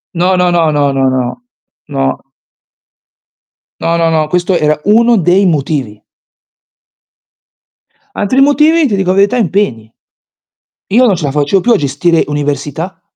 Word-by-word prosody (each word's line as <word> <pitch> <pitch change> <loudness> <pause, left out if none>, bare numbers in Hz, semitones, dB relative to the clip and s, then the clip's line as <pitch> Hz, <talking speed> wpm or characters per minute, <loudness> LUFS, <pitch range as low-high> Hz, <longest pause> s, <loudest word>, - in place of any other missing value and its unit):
No, 180 +2 +1
no, 180 0 +2
no, 165 -3 +1
no, 145 -2 0
no, 135 -1 +1
no. 130 - -3 0.5
No. 135 -1 -3 1.6
No, 170 0 0
no, 165 -1 +1
no, 155 -1 0
questo 180 +1 0
era 150 0 0
uno 230 +2 +3
dei 185 +3 +2
motivi. 140 - -2 2.2
Altri 255 +7 0
motivi, 300 +3 +3
ti 205 - -1
dico 190 -1 -1
la 190 - +1
verità, 205 +5 +2
impegni. 165 - -2 1.0
Io 255 +3 +5
non 210 -6 +3
ce 165 -3 -5
la 140 - -1
facevo 150 +7 0
più 240 - +1
a - - +4
gestire 150 +4 0
università 145 +4 -4
170 Hz, 140 wpm, -12 LUFS, 145-200 Hz, 2.2 s, Io